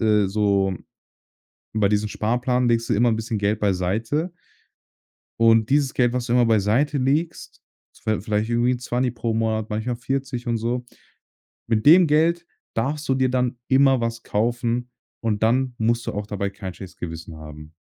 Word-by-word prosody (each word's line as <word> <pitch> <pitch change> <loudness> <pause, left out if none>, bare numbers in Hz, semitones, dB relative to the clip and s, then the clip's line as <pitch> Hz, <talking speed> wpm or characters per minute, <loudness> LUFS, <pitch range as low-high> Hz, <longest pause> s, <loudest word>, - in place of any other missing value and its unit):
äh, 105 -3 +3
so“ 100 -1 +1 1.0
Bei 105 -2 +3
diesem 105 +1 +1
Sparplan 125 +3 0
legst 115 0 +1
du - - +2
immer 120 +3 +3
'n 110 - 0
bisschen 110 0 -3
Geld 100 +1 0
beiseite. 110 - -1 1.1
Und 115 0 +4
dieses 140 -2 +2
Geld, 120 -2 +2
was 125 -1 -2
du 120 - -1
immer 120 -1 +4
beiseite 115 +7 +2
legst, 150 +6 -1 0.4
viel 110 -1 0
vielleicht 105 +1 -1
irgendwie 120 +1 +2
'n 125 - -2
Zwanni 125 +1 -1
pro 115 -1 -3
Monat, 110 -1 -1
manchmal 115 +3 -2
40 130 0 -3
und 120 -1 0
so. 120 +2 -2 0.8
Mit 110 -2 0
dem 175 +3 +8
Geld 165 +3 +2 0.3
darfst 145 +6 -2
du 135 - +3
dir 130 0 +2
dann 125 -1 0
immer 135 -1 +4
was 115 0 -3
kaufen, 120 +2 -1 0.3
und 110 -2 -1
dann 125 +2 +2
musst 115 +1 0
du - - -2
auch 105 0 -4
dabei 100 -1 -3
kein 95 -2 -7
schlechtes 90 0 -11
Gewissen 80 -1 -7
haben. 75 0 -11
115 Hz, 170 wpm, -23 LUFS, 105-125 Hz, 1.1 s, dem